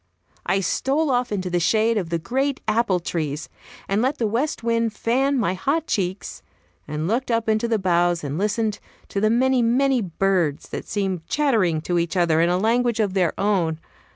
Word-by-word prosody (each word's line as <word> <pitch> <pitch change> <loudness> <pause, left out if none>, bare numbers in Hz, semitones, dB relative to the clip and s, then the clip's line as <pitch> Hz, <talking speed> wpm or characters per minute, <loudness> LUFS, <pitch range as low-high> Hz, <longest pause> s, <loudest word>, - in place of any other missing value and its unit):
I 195 - +2
stole 280 - 0
off 245 -1 0
into 185 -3 -2
the 175 - +1
shade 220 +6 +2
of 185 -6 -2
the 170 - 0
great 265 - -1
apple 215 -4 +2
trees, 155 -3 -3 0.4
and 200 +2 +1
let 265 +4 0
the 230 - 0
west 235 +5 -1
wind 230 -1 0
fan 270 +5 +1
my 200 -7 +1
hot 280 - -1
cheeks, 190 - -3 0.5
and 150 +2 -3
looked 240 +6 -1
up 230 -1 0
into 220 +1 +1
the 230 -1 +1
boughs, 175 -3 +1
and 145 0 -3
listened 210 +3 -1 0.3
to 200 - -2
the 215 - +3
many, 255 +2 +3
many 255 +2 +2
birds 180 -5 0
that - - -6
seemed 190 -5 -2
chattering 220 - +1
to 175 +1 0
each 170 +1 -2
other 165 -2 +3
in 170 - +3
a 180 - +2
language 235 +3 +1
of 205 -4 +1
their 180 -4 0
own. 180 -6 +1
210 Hz, 190 wpm, -23 LUFS, 175-235 Hz, 0.5 s, the